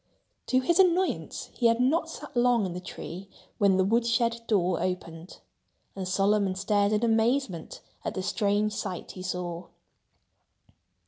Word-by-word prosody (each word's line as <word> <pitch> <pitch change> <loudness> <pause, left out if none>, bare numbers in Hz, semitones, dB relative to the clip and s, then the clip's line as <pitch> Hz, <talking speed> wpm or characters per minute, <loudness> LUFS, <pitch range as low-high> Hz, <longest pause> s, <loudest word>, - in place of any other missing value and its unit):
To 255 0 +3
his 340 +8 +2
annoyance, 370 0 +1
he 240 - +2
had 230 0 +2
not 315 +6 +2
sat 295 -3 -9
long 240 -3 +3
in 180 - -4
the 180 - -5
tree 180 +1 -8 0.3
when 200 -3 +4
the 190 - +4
wood 225 +5 +2
shed 230 0 +1
door 185 -5 +1
opened. 175 -2 -5 0.5
And 190 -2 -4
Solomon 195 0 +2
stared 200 +1 +1
in 215 +2 +1
amazement 225 - 0 0.2
at - - -3
the 190 - -2
strange 205 +1 +1
sight 190 -4 -5
he 185 - -9
saw. 180 -2 -4
205 Hz, 150 wpm, -27 LUFS, 185-235 Hz, 0.5 s, when